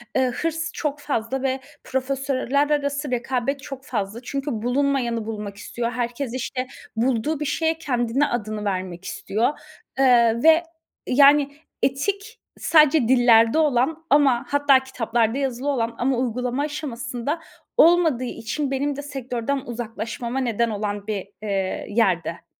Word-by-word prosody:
Iıı, 260 -1 +2
hırs 325 +4 -2
çok 295 -1 -3
fazla 265 -2 -2
ve 265 0 0 0.2
profesörler 270 +1 0
arası 285 -1 -1
rekabet 255 +3 -1
çok 270 -1 -8
fazla. 210 -1 -3
Çünkü 275 +3 -3
bulunmayanı 245 -3 0
bulmak 210 -2 -5
istiyor, 235 +3 -4
herkes, 245 +1 -3
işte, 255 0 -3 0.3
bulduğu 255 +5 0
bir 300 - -2
şeye 320 +2 0
kendini, 255 -2 0
adını 215 -2 -3
vermek 185 -2 -3
istiyor, 235 +8 -1 0.4
ııı, 235 -2 +4
ve, 325 +1 +6 0.4
yani, 285 +2 +5 0.3
etik 400 - -1 0.2
sadece 305 -5 +5
dillerde 240 0 +5
olan 305 +2 +1
ama 275 -4 +4
hatta 285 -2 +5
kitaplarda 235 -1 0
yazılı 265 -1 -2
olan 235 -4 -1
ama 255 +1 +1
uygulama 250 +2 -1
aşamasında 290 0 -4 0.4
olmadığı 325 -7 +5
için 260 +4 -3
benim 280 +1 -1
de 285 - -5
sektörden 270 -2 -3
uzaklaşmama 235 +2 -4
neden 235 -2 0
olan 205 -1 -3
bir, 205 -3 -3
eee, 195 -3 -2
yerde. 185 -7 0
255 Hz, 130 wpm, -23 LUFS, 230-285 Hz, 0.4 s, ve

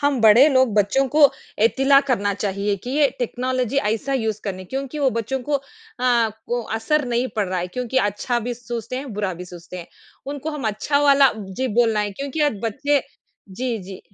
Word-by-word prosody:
हम 285 -4 +1
बड़े 225 +7 +7
लोग 260 -6 +3
बच्चों 215 +7 +2
को 290 -1 +6 0.3
एतिला 270 +3 +5
करना 205 -4 +1
चाहिए 200 0 -1
कि 245 +6 -8
ये 285 0 +3
टेक्नोलॉज़ी 255 +1 -2
ऐसा 225 +4 -1
यूज़ 220 -5 -1
करने, 185 -2 -4
क्योंकि 270 +6 -5
वो 270 -2 +2
बच्चों 230 +4 -2
को 295 - -5
अ, 275 - +1 0.4
को 235 -1 0
असर 240 +7 0
नहीं 240 +2 0
पड़ 200 -3 0
रहा 185 -1 -1
है 175 - -2
क्योंकि 250 +6 -4
अच्छा 205 +3 0
भी 240 +2 -3
सोचते 240 0 -6
हैं, 265 -3 -6
बुरा 200 -2 -1
भी 180 +2 -8
सोचते 175 0 -10
हैं। 170 - -8 0.4
उनको 290 +2 -4
हम 290 -7 -4
अच्छा 220 +7 0
वाला 280 -2 +6
जी, 205 +5 -4
बोलना 225 -1 +2
है 205 -1 -2
क्योंकि 280 +6 -5
आज 205 - -8
बच्चे 280 +5 +1 0.5
जी, 240 +4 -3
जी। 190 0 -9
240 Hz, 195 wpm, -22 LUFS, 210-270 Hz, 0.5 s, बड़े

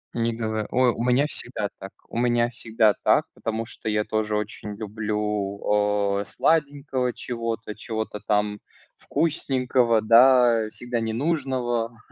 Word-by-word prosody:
Не 115 0 +1
говор 110 -2 -3
О, 125 0 +3
у 115 - -3
меня 125 +3 +3
всегда 120 -7 -3
так, 95 0 -8 0.2
у - - -7
меня 120 -1 +2
всегда 110 -3 +2
так, - - +4
потому 115 0 -3
что 110 - -6
я 105 0 +1
тоже 110 0 -1
очень 105 0 -5
люблю, 105 -1 -1
э, - - -6
сладенького, 140 -5 0
чего-то, 115 -2 -4
чего-то 110 -1 -5
там 105 0 0 0.4
вкусненького, 125 -7 +1
да, 115 0 +5
всегда 120 +1 -4
ненужного, 120 -2 -1
115 Hz, 130 wpm, -24 LUFS, 105-125 Hz, 0.4 s, да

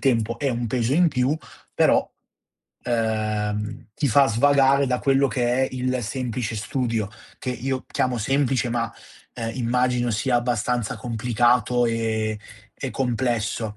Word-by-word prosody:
tempo, 115 -4 +1
è 140 - 0
un 120 -1 -1
peso 120 +2 0
in 175 +2 +5
più, 130 -1 +1 0.4
però, - - +4 0.8
ehm, 110 -2 -1
ti 145 - 0
fa 135 +4 +5
svagare 140 +3 +4
da 125 -1 +1
quello 135 0 +3
che 120 +1 +1
è - - -6
il 130 -1 -1
semplice 120 -1 -3
studio, 115 -1 -1 0.3
che 130 - -3
io 130 +1 -3
chiamo 125 -2 0
semplice, 135 +1 +1
ma, 115 -1 -1 0.4
uhm, 115 -2 -3
immagino 125 0 +1
sia 120 +4 0
abbastanza 120 -1 -1
complicato 120 +1 +1
e 110 -1 -1 0.5
e 135 - -1
complesso. 115 -4 -1
120 Hz, 135 wpm, -23 LUFS, 115-130 Hz, 0.8 s, in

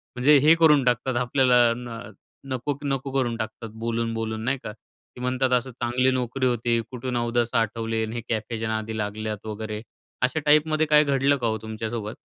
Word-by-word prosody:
म्हणजे 140 +4 +5
हे 150 +4 +6
करून 150 -4 +5
टाकतात 125 +1 +1
आपल्याला 125 -2 +4
न 120 -2 -7 0.5
नको, 130 +2 -2
नको 135 -1 -2
करून 125 -4 0
टाकतात 110 0 -6
बोलून, 115 0 -1
बोलून 110 -1 -3
नाही 135 +3 +1
का? 105 - -5
की 120 +3 -18
म्हणतात, 130 +1 0
असं 125 +1 +1
चांगली 125 +2 +1
नोकरी 130 +1 -1
होती. 120 -1 +1
कुठून 125 0 -3
अवदासा 120 0 +1
आठवले 115 0 -2
आणि 110 +1 -7
हे 120 - -3
कॅफेच्या 110 0 -2
नादी 110 0 -3
लागल्यात 105 0 -4
वगैरे, 110 0 -5 0.4
अशा 130 +5 +1
टाईपमध्ये 155 +1 +4
काय 150 0 +6
घडलं 140 0 +2
का 120 -3 -1
हो 110 - 0
तुमच्यासोबत? 110 0 -5
120 Hz, 175 wpm, -25 LUFS, 110-130 Hz, 0.5 s, हे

